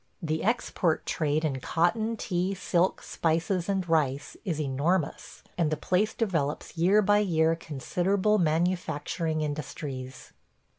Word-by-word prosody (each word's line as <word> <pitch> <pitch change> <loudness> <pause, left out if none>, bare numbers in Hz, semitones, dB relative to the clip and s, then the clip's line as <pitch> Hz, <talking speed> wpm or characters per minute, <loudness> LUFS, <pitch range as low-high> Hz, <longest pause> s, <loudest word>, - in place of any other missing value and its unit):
The 160 -1 -2
export 200 -7 0
trade 155 0 0
in 135 -4 -1
cotton, 215 - 0
tea, 185 0 -1
silk, 180 -1 +1
spices, 170 +3 0
and 190 -2 0
rice 145 -4 0
is 170 -8 -2
enormous, 150 +4 -1 0.2
and 165 -3 +3
the 155 - -1
place 200 +7 +1
develops 165 -11 -1
year 190 +6 +4
by 205 +1 +4
year 165 -5 +2
considerable 180 +7 0
manufacturing 160 -1 0
industries. 140 -3 -5
165 Hz, 120 wpm, -28 LUFS, 155-190 Hz, 0.2 s, year